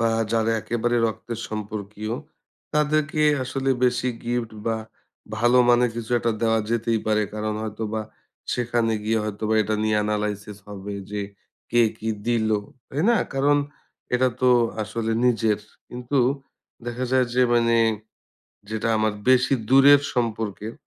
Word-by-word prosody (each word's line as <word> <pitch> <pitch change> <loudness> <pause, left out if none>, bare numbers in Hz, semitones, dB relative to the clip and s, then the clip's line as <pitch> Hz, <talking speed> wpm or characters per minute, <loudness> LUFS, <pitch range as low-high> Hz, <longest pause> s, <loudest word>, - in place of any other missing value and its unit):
বা 115 0 +2 0.2
যারা 115 0 +2
একেবারে 120 +2 -1
রক্তের 110 +1 -5
সম্পর্কীয়, 105 +1 -5 0.6
তাদেরকে 150 0 +1 0.2
আসলে 135 +1 -1
বেশি 125 0 +1 0.2
গিফট 120 -1 -2 0.2
বা 115 -1 +1 0.6
ভালো 120 +3 +4
মানের 120 0 +4
কিছু 115 0 -6
একটা 115 0 0
দেওয়া 115 0 +3
যেতেই 115 -1 0
পারে। 110 0 +2
কারণ 105 0 -2
হয়তো 110 0 -5
বা 110 - -1 0.5
সেখানে 120 -2 0
গিয়ে 110 +1 +1
হয়তো 105 0 -5
বা 110 - +2
এটা 110 +1 -1
নিয়ে 110 -1 +2
analysis 105 -1 -3
হবে 100 0 -6 0.2
যে 105 -1 -2 0.5
কে 120 0 +4 0.2
কি 110 - -4 0.2
দিলো। 110 -3 +2 0.3
তাই 145 +4 -2
না? 235 - +4 0.2
কারণ 145 +2 +3 0.6
এটা 130 +1 +3
তো 125 - +5 0.3
আসলে 115 +1 -2
নিজের। 115 -3 +2 0.3
কিন্তু 125 +3 -2 0.7
দেখা 120 +1 -3
যায় 130 -1 +4
যে, 125 - +4
মানে 115 -1 +3 0.9
যেটা 110 +1 -2
আমার 110 -1 +1 0.2
বেশি 130 +1 +4 0.2
দূরের 140 +2 +7
সম্পর্কের, 110 -2 -2
115 Hz, 140 wpm, -24 LUFS, 110-125 Hz, 0.9 s, দূরের